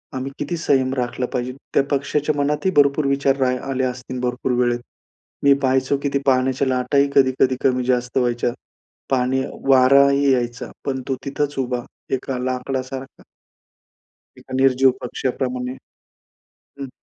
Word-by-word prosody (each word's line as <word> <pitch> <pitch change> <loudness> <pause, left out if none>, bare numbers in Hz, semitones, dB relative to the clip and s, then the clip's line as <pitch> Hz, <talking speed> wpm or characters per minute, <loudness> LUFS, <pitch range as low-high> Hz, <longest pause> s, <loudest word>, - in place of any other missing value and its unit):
आम्ही 130 +1 -4
किती 150 +4 -3
संयम 135 -5 +1
राखला 125 -1 -2
पाहिजे. 125 +1 -2 0.2
त्या - - +4
पक्षाच्या 145 +2 0
मनात 145 +2 0
ही 190 - +3
भरपूर 140 +1 +4
विचार 140 0 +2
रा 130 - +3 0.2
आले 130 -1 -1
असतील, 125 0 -4
भरपूर 125 +1 -1
वेळेत. 120 0 0 0.6
मी 140 0 +7
पाहायचो 130 +1 +2
की 140 - +1
ती 140 - +2
पाण्याच्या 130 0 +2
लाटा 125 +1 0
ही 140 0 +4
कधी-कधी, 130 -1 +3
कमी-जास्त 125 -1 +1
व्हायच्या, 120 -1 +1 0.6
पाणी 130 0 +1 0.3
वारा 135 +1 +6
ही 140 0 +3
यायचा. 120 -1 -2
पण 130 -2 -2
तो 135 - 0
तिथंच 145 +1 -2
उभा, 125 -2 -2 0.3
एका 130 0 -4
लाकडासारखा. 130 +1 -4 1.2
एका - - -10
निर्जीव 130 0 +4
पक्ष्याप्रमाणे, 125 0 -3 1.1
हं. 135 -1 -5
130 Hz, 140 wpm, -21 LUFS, 125-140 Hz, 1.2 s, मी